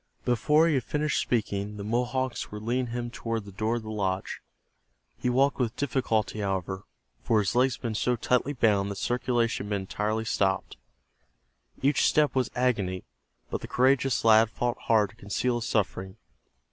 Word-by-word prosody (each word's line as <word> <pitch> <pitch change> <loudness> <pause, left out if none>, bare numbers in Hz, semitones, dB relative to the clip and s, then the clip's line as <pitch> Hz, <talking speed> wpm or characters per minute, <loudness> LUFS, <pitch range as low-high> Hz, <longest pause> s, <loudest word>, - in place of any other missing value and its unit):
Before 150 +7 +3
he 165 - +2
had 130 -4 +1
finished 150 0 0
speaking 105 -3 -2
the 100 - -5
Mohawks 125 +3 -1
were 105 - -6
leading 120 +4 -1
him 120 0 -4
toward 115 -3 -3
the 100 - -10
door 110 +4 -1
of 120 - -4
the 110 - -6
lodge. 95 -3 -2 0.8
He 125 - 0
walked 135 +3 +2
with 120 -1 0
difficulty, 120 -6 -1
however, 95 -1 -2 0.4
for 115 - +2
his 100 -2 +1
legs 125 +1 +3
had 115 - -20
been 115 -2 -1
so 125 +3 +1
tightly 125 +4 +1
bound 105 -6 +2
that 100 - -4
circulation 120 -1 0
had - - -8
been 100 -2 -1
entirely 105 +3 -2
stopped. 95 - 0 1.1
Each 140 +1 +3
step 150 -1 +3
was 130 -2 +1
agony, 105 -8 0 0.5
but - - -2
the - - -7
courageous 130 -1 +2
lad 110 0 +6
fought 120 +2 -2
hard 110 -3 +3
to - - -21
conceal 120 +4 -1
his - - -3
suffering. 95 -3 -1
115 Hz, 175 wpm, -27 LUFS, 105-125 Hz, 1.1 s, lad